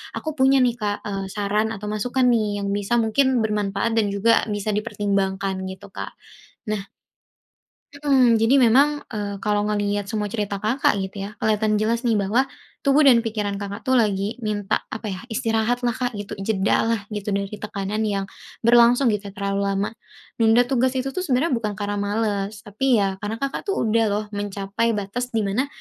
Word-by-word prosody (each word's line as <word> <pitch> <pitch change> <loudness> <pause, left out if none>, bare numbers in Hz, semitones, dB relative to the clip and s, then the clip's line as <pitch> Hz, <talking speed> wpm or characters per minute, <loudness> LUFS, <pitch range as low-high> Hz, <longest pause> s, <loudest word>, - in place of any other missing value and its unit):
Aku 315 -1 -4
punya 265 0 +5
nih 240 -1 +1
Kak, 205 -1 -2
eee, 195 -1 -3
saran 205 +2 0
atau 210 +1 -5
masukan 250 +5 0
nih 210 -3 0
yang 200 - -1
bisa 205 +3 0
mungkin 245 +1 +2
bermanfaat 210 +1 -1
dan 215 -2 +3
juga 200 +3 +3
bisa 205 0 -2
dipertimbangkan 195 -2 -1
gitu, 190 +2 -9
Kak. - - -7 0.5
Nah 215 -2 -1 1.1
Mhm, 270 -5 +3
jadi 225 +5 +4
memang, 280 +4 +4
eee, 205 -2 -3
kalau 210 0 +1
ngelihat 205 -1 -1
semua 210 0 -2
cerita 205 -3 -2
Kakak 235 +4 +2
gitu 195 +1 -5
ya, 210 - -12
kelihatan 215 0 +1
jelas 230 +3 0
nih 230 - +3
bahwa 210 +7 +1 0.3
tubuh 280 +2 +4
dan 260 -4 +7
pikiran 210 -3 -2
Kakak 200 +1 -6
tuh 260 -2 +3
lagi 205 +1 0
minta 210 -3 -1
apa 220 -2 -5
ya, 185 - -5
istirahat 225 +1 0
lah, 240 - +2
Kak, 245 0 -3
gitu, 205 0 -7
jeda 195 +2 +1
lah 230 -2 +1
gitu 205 -1 -2
dari 200 0 -2
tekanan 205 0 -4
yang 200 -1 -1 0.4
berlangsung 240 +1 +5
gitu 205 -1 -3
terlalu 200 0 -1
lama. 195 +1 0 0.5
Nunda 225 +2 +5
tugas 255 +1 +1
itu 260 +1 -1
tuh - - -4
sebenarnya 300 -2 +1
bukan 220 -4 -1
karena 205 0 -3
males, 205 0 -2
tapi 245 +6 +1
ya 195 -3 0
karena 205 +2 -3
Kakak 275 - -4
tuh 395 - 0
udah 225 0 +2
loh 205 +1 0
mencapai 205 +2 -1
batas 210 +5 -3
di 220 - +2
mana 220 +8 0
215 Hz, 180 wpm, -23 LUFS, 200-235 Hz, 1.1 s, dan